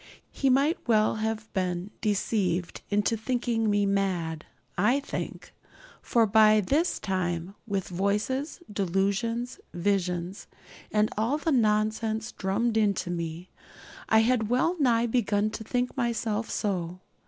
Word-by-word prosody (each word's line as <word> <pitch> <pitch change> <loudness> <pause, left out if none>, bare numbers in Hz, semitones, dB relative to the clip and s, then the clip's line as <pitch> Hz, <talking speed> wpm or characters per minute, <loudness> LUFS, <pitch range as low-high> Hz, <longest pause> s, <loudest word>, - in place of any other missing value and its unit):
He 275 - +1
might 280 +6 +3
well 215 -1 +3
have 220 0 -3
been 185 0 -2
deceived 190 -4 0
into 205 +2 +1
thinking 230 -1 0
me 205 0 +2
mad, 185 -5 -1 0.3
I 230 +9 +3
think; 285 - -6 0.5
for 230 -2 +3
by 215 0 +6
this 290 - +1
time, 180 -2 -2
with 195 -3 -2
voices, 210 - -1
delusions, 200 +6 -1 0.2
visions, 180 0 -1 0.4
and 210 0 +2
all 235 +7 +1
the 315 +2 -1
nonsense 220 -1 +1
drummed 220 +4 0
into 200 -4 +1
me, 170 +1 -5 0.6
I 220 0 +6
had 225 -2 +1
well 255 +9 +2
nigh 240 -4 +3
begun 215 -3 +1
to 220 - -6
think 250 +2 -1
myself 230 -3 -1
so. 180 -3 -2
215 Hz, 125 wpm, -27 LUFS, 190-235 Hz, 0.6 s, by